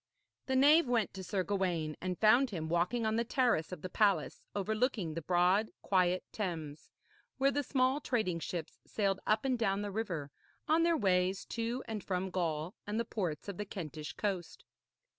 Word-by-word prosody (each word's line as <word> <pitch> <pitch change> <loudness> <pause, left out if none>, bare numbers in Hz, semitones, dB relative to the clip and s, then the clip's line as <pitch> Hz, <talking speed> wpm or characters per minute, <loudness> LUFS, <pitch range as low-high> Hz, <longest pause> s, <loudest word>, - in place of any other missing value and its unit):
The 265 - +1
knave 290 +3 +6
went 235 -4 +1
to 190 - -7
Sir 185 +1 -1
Gawaine, 175 -6 -1
and 180 -1 -2
found 245 +5 +5
him 160 -6 -4
walking 180 +8 +1
on 220 0 +1
the 235 - +2
terrace 235 - +1
of 180 -4 -7
the - - -2
palace 195 -6 +1
overlooking 215 - 0
the 165 - -4
broad 180 +6 +3
quiet 185 -1 +2
Thames, 160 -7 -4 0.5
where 275 +1 +3
the 290 - 0
small 260 0 +1
trading 215 -12 0
ships 165 -1 -5
sailed 195 -2 0
up 215 +4 +2
and 255 -3 +1
down 200 -2 +1
the 205 - -3
river 180 -9 -3 0.4
on 315 +2 +4
their 335 -1 +3
ways 185 -2 +1
to 235 +3 -2
and 215 -3 -4
from 185 0 -2
Gaul 165 -1 -1
and 210 +2 -1
the 235 - 0
ports 180 -9 -3
of 200 -3 -5
the 210 - -3
Kentish 155 -6 -6
coast. 190 -5 -3
195 Hz, 180 wpm, -33 LUFS, 175-230 Hz, 0.5 s, knave